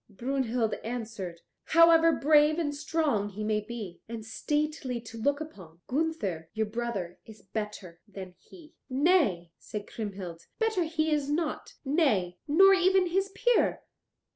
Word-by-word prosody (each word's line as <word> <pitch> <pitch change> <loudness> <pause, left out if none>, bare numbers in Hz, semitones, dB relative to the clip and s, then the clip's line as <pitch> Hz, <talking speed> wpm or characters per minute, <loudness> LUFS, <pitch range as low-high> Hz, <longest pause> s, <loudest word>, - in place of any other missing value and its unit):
Brunhild 240 0 -1
answered, 215 -7 -5 0.2
"However 330 0 +6
brave 300 0 +4
and 305 -4 -1
strong 290 -8 0
he 210 +1 -6
may 210 0 +1
be, 210 -5 -8
and 230 -2 -6
stately 295 +1 -2
to 225 0 -9
look 285 +4 +1
upon, 185 - -10
Gunther, 250 - -2
your 220 0 +1
brother, 210 -6 -4
is 215 -2 -14
better 195 -5 -6
than 190 -3 -9
he." 335 -3 -16 0.2
"Nay," 260 - +2
said 210 -1 -6
Kriemhild, 190 -6 -7
"better 440 -6 +1
he 315 -1 0
is 290 -2 0
not, 305 +1 -2
nay, 220 - +1
nor 385 +6 +7
even 375 -1 +3
his 385 +3 0
peer." 485 +4 +1
245 Hz, 140 wpm, -29 LUFS, 205-315 Hz, 0.2 s, nor